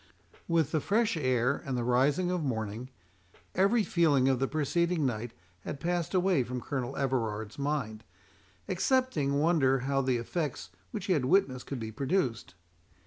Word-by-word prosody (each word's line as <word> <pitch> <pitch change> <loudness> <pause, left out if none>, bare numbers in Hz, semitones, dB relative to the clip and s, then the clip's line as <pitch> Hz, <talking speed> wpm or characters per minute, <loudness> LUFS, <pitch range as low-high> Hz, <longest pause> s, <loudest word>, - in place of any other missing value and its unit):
With 165 -4 +2
the 155 - +1
fresh 225 +4 +1
air 130 -3 +1
and 130 -2 -3
the 120 - -1
rising 140 +9 +2
of 180 -3 -1
morning, 110 -1 -3 0.6
every 205 +4 +3
feeling 150 -9 +3
of 130 -2 +2
the 135 - +1
preceding 160 +2 0
night 120 -2 -2 0.3
had 140 - -6
passed 175 +2 -1
away 185 -5 +3
from 125 +1 -4
Colonel 130 +1 -4
Everard's 110 -5 -2
mind, 135 -7 -2 0.6
excepting 180 - +1
wonder 145 -4 +3
how 135 +1 0
the 130 -2 +1
effects 120 - -4 0.2
which 180 - -5
he 190 - +2
had 145 -7 +1
witnessed 130 -5 +2
could 135 - -4
be 110 -1 -5
produced. 130 - -1
140 Hz, 155 wpm, -30 LUFS, 125-170 Hz, 0.6 s, every